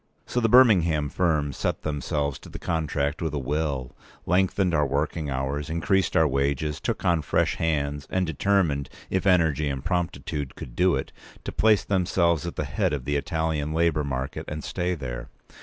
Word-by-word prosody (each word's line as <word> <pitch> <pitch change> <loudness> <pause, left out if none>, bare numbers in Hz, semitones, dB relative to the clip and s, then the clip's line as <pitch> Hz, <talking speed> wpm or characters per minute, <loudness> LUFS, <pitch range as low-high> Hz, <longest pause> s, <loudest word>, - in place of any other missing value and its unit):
So 125 - -1
the 115 -2 +2
Birmingham 85 - +5
firm 75 -4 +1
set - - -2
themselves 75 -1 -2
to - - -13
the - - -7
contract 75 -2 -1
with 80 -3 -2
a - - 0
will, 70 -2 -2 0.3
lengthened 95 0 +2
our 75 -2 +3
working 75 +2 -1
hours, 70 +3 -2
increased 90 +3 +1
our 80 - +5
wages, 70 +2 0
took - - -2
on 85 -3 +3
fresh - - +1
hands, 75 -3 -1
and 95 0 +1
determined, 80 -4 +1 0.2
if 95 +1 0
energy 80 -5 +3
and 70 0 -4
promptitude 85 -6 -2
could - - -9
do 90 -2 +3
it, 65 - -4 0.3
to - - -4
place 110 -2 +3
themselves 85 -3 +1
at 85 - -5
the - - -1
head - - 0
of 70 -4 -3
the 75 - 0
Italian 80 0 -1
labour 80 -2 +2
market, 65 -1 -4
and 75 0 -5
stay 90 0 -1
there. 65 -4 -6
75 Hz, 175 wpm, -25 LUFS, 70-85 Hz, 0.3 s, Birmingham